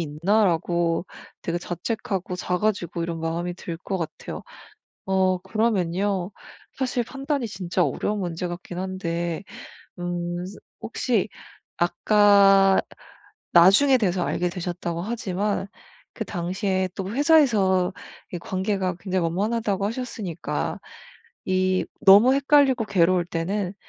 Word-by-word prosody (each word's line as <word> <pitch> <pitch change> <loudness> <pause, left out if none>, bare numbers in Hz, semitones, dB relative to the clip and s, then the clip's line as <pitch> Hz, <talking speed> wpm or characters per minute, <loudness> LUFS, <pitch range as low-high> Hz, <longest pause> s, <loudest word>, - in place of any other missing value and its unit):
있나?'라고 170 0 +1 0.4
되게 170 +1 -2
자책하고 185 +1 -4
작아지고 180 -2 -1
이런 165 0 -3
마음이 170 +2 -2
들 170 -2 -6
것 190 +1 -3
같아요. 165 - -6 0.6
어 190 -1 +2
그러면요. 190 -2 0 0.5
사실 255 -2 0
판단이 275 +1 -3
진짜 185 -3 -2
어려운 205 +9 -2
문제 175 -1 -3
같긴 175 0 -7
한데 175 -2 -3 0.6
음 175 0 -3 0.4
혹시 225 -2 0 0.5
아까 195 +1 +5 0.7
나중에 200 +11 +6
돼서 185 -5 0
알게 180 0 -1
되셨다고 175 -1 -4
하지만 205 -1 -2 0.5
그 - - -4
당시에 185 +1 -1
또 190 0 -4
회사에서 225 - +3 0.4
이 175 - -2
관계가 190 0 -2
굉장히 185 -3 -1
원만하다고 200 +3 -1
하셨으니까 220 -7 -4 0.7
이 185 0 +1 0.2
너무 205 +7 +8
헷갈리고 275 -4 +4
괴로울 180 -3 +2
때는 180 +3 -2
185 Hz, 255 characters per minute, -24 LUFS, 175-210 Hz, 0.7 s, 너무